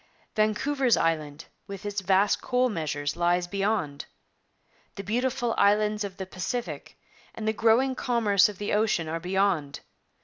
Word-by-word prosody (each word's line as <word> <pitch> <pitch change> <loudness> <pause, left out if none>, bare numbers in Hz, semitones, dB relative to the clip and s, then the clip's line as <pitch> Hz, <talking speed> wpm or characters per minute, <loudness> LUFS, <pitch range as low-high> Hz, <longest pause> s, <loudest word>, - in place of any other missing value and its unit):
Vancouver's 235 +5 +1
Island, 155 -2 -1 0.2
with 200 0 -8
its 205 -1 -2
vast 195 +2 +2
coal 250 0 +1
measures, 145 -6 -3
lies 175 +1 +1
beyond. 195 -6 -2 0.9
The 200 - -6
beautiful 240 +3 -1
islands 210 +1 +3
of 195 -2 -6
the 190 - -5
Pacific 190 +6 -5 0.4
and 220 - -5
the 220 - +2
growing 230 +5 +3
commerce 225 -6 +2
of 205 - -9
the 205 - -3
ocean 210 -6 +1
are 165 +1 -3
beyond. 180 -5 0
200 Hz, 140 wpm, -27 LUFS, 175-225 Hz, 0.9 s, islands